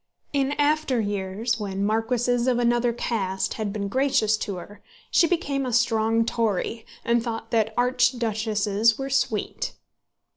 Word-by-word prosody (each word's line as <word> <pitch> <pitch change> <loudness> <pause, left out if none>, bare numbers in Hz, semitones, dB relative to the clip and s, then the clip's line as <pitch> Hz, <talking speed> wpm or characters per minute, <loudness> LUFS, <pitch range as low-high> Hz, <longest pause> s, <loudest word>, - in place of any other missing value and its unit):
In 275 0 +1
after 290 -3 +1
years, 205 +3 -2
when 200 -1 -2
marquises 240 +3 +1
of 250 -2 +3
another 240 0 +2
caste 195 -5 -2
had 215 -2 -3
been 200 -1 -3
gracious 260 -2 +2
to 200 -2 -4
her, 200 +4 -10 0.3
she 335 - +5
became 285 -5 -1
a 255 - -2
strong 225 -1 +2
Tory, 225 0 -1 0.2
and 235 0 +3
thought 225 -1 -5
that 220 -1 +2
archduchesses 225 -4 +2
were 270 0 -4
sweet. 225 -5 -1
230 Hz, 140 wpm, -25 LUFS, 215-250 Hz, 0.3 s, she